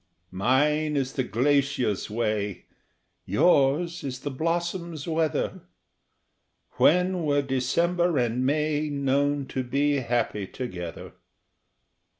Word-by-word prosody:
Mine 150 +9 +1
is 135 -1 -1
the 130 - 0
glacier's 130 -3 +1
way, 105 -3 -2 0.6
yours 155 - +2
is 130 -2 -5
the 145 - -4
blossom's 170 +1 -2
weather 160 -1 -1 1.2
When 180 +2 +3
were 145 -2 +2
December 170 +6 +1
and 120 0 0
May 150 +2 0
known 140 0 0
to 130 - -2
be 140 +3 +1
happy 115 -5 -1
together? 90 - -7
140 Hz, 100 wpm, -26 LUFS, 125-155 Hz, 1.2 s, When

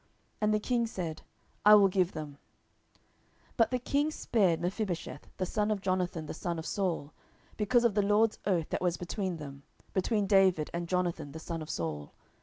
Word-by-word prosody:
And 210 0 +3
the 215 - +2
king 235 +1 0
said, 170 -7 -5 0.4
I 210 +1 +9
will 200 -1 +7
give 185 -1 +1
them. 145 -2 -7 1.1
10:021:007 - - -31
But 230 - +4
the 255 - 0
king 285 +4 0
spared 195 - +1
Mephibosheth, 175 -4 -3
the 185 - -1
son 210 +3 0
of 210 -2 0
Jonathan 185 -4 -1
the - - -5
son 170 +1 -3
of 160 - -5
Saul, 175 -7 -2 0.4
because 225 +3 +2
of 235 -3 +3
the 205 - +3
LORD's 210 +2 +2
oath 175 -5 +1
that - - -2
was 180 -1 +1
between 180 0 -3
them, 140 -2 -9 0.3
between 205 +2 +1
David 190 -6 +3
and 170 0 -3
Jonathan 170 -5 -1
the - - -6
son 165 0 -5
of 155 - -8
Saul. 75 -3 -4
185 Hz, 190 wpm, -30 LUFS, 165-210 Hz, 1.1 s, I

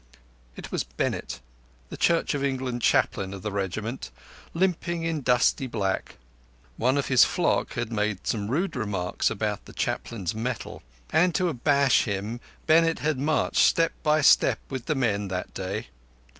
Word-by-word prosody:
It - - -9
was - - -1
Bennett, - - -3 0.5
the - - -6
Church 170 -1 +2
of 140 -1 -2
England 130 -3 -2
Chaplain 100 -7 +1
of 95 - -10
the 105 - -3
regiment, 100 +5 -3 0.4
limping 175 -1 0
in 165 -2 -1
dusty 125 +1 +2
black. 100 -5 -2 0.6
One 130 +4 +1
of 140 - 0
his 130 -2 +6
flock - - +1
had 120 -1 -3
made 105 -3 -1
some 105 -3 -1
rude 170 +9 -1
remarks 100 -7 -1
about - - -3
the - - -12
Chaplain's 100 -8 -3
mettle; 115 +1 -4 0.3
and 175 +1 +3
to 180 -2 +2
abash 140 -1 +3
him 105 +2 -3 0.3
Bennett 165 +1 +4
had 150 -3 -1
marched 150 +2 0
step 165 0 +3
by 155 0 +3
step - - +5
with 130 -3 -5
the 155 - +1
men 105 -6 0
that 90 -1 -4
day. 100 +5 -4
125 Hz, 155 wpm, -26 LUFS, 105-150 Hz, 0.6 s, his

